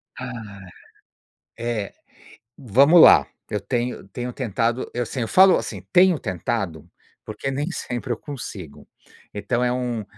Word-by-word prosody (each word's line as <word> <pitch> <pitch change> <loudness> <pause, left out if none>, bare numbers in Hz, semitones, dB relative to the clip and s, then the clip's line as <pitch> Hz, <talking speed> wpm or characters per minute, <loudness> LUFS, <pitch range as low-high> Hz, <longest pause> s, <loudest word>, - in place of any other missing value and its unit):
Ai. 110 -7 -9 0.9
É, 115 -4 -3 0.7
vamos 140 - +5
lá, - - +8 0.2
eu 105 - -2
tenho 120 -4 -3
tenho 125 +3 -5
tentado, 120 0 -2
eu 120 0 -2
sim 125 +3 -5
Eu 115 - -2
falo 190 - +6
assim, 100 -5 -5
tenho 180 -3 +5
tentado 95 -4 -4 0.4
porque 135 - -5
nem 145 +5 -2
sempre 125 -7 -5
eu 115 - -1
consigo. 105 - -9 0.5
Então 120 +4 -1
é 125 - +1
um 125 -3 -2
120 Hz, 135 wpm, -22 LUFS, 105-130 Hz, 0.9 s, lá